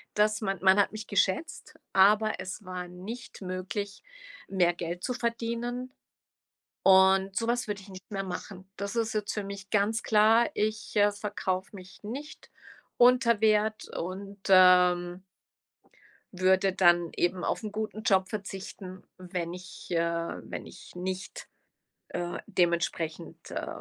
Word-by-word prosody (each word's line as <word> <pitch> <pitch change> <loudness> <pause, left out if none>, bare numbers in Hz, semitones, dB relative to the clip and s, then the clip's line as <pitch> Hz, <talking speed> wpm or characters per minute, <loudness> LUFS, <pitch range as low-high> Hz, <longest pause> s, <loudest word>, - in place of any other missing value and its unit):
dass 215 +1 +2
man 195 -2 -1
man 190 +1 +6
hat 200 - +3
mich 215 0 -7
geschätzt, 305 - -1 0.2
aber 210 +3 +4
es 190 +2 -7
war 180 -1 -5
nicht 200 +9 -9
möglich, 190 +2 -4 0.5
mehr 180 -3 +2
Geld 175 +1 -5
zu 250 - -1
verdienen 235 +1 -3 0.9
und 190 0 +5
so 230 - 0
was 240 0 0
würde 205 -1 -3
ich 195 - -15
nicht 190 +2 -12
mehr 195 -1 -2
machen. 185 +1 -7
Das 200 +3 -4
ist 225 -1 0
jetzt 210 -1 -2
für 210 -2 -3
mich 195 0 -8
ganz 215 +2 +1
klar, 220 +2 +4
ich, 215 +1 -2
äh, 205 0 +4
verkaufe 200 -2 -3
mich 185 +2 -14
nicht 275 +9 -8 0.5
unter 245 -2 +5
Wert 215 0 +2
und, 195 +3 -6
ähm 180 -1 +5 1.1
würde 190 +1 +3
dann 175 -3 +4
eben 175 +1 0
auf - - -1
'n 215 - -4
guten 215 0 -4
Job 190 -3 +3
verzichten, 190 -2 -7
wenn 180 -2 -4
ich, 180 +1 -11
äh 170 - +1 0.5
wenn - - -7
ich - - -13
nicht, 185 - -5 0.6
äh, 175 0 -4
dementsprechend, 170 -3 -1
äh - - -4
195 Hz, 140 wpm, -28 LUFS, 185-215 Hz, 1.1 s, man